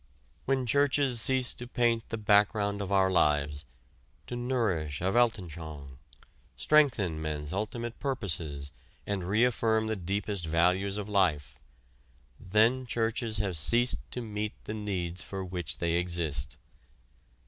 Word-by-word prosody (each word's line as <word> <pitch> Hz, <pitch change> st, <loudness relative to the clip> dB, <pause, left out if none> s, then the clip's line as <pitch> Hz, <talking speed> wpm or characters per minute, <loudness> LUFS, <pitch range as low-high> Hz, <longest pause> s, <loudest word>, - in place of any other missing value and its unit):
When 135 Hz, -1 st, +1 dB
churches 140 Hz, -1 st, +2 dB
cease 130 Hz, +1 st, +2 dB
to 120 Hz, -, -6 dB
paint 120 Hz, -2 st, +1 dB
the 115 Hz, -, -3 dB
background 105 Hz, -1 st, +2 dB
of 100 Hz, -1 st, -4 dB
our 95 Hz, -1 st, +3 dB
lives, 75 Hz, -3 st, +1 dB, 0.6 s
to 125 Hz, -, -6 dB
nourish 110 Hz, -, -1 dB
a 95 Hz, +2 st, 0 dB
Weltanschaung, 80 Hz, -, -1 dB, 0.6 s
strengthen 100 Hz, -, +3 dB
men's 75 Hz, 0 st, -4 dB
ultimate 115 Hz, +4 st, -4 dB
purposes 80 Hz, -, -2 dB, 0.3 s
and 100 Hz, -3 st, -2 dB
reaffirm 110 Hz, 0 st, +2 dB
the 110 Hz, 0 st, -1 dB
deepest 100 Hz, -1 st, -3 dB
values 90 Hz, +5 st, +2 dB
of 105 Hz, -1 st, -4 dB
life, 90 Hz, -9 st, +1 dB, 0.9 s
then 110 Hz, +7 st, +2 dB
churches 115 Hz, -1 st, -1 dB
have 95 Hz, -3 st, -1 dB
ceased 120 Hz, +9 st, +2 dB
to 125 Hz, -, -5 dB
meet 105 Hz, -2 st, -3 dB
the 105 Hz, -, -5 dB
needs 95 Hz, -5 st, -3 dB
for 95 Hz, +1 st, -5 dB
which 90 Hz, -3 st, -5 dB
they 85 Hz, -1 st, 0 dB
exist. 85 Hz, -5 st, -2 dB
100 Hz, 125 wpm, -29 LUFS, 85-115 Hz, 0.9 s, our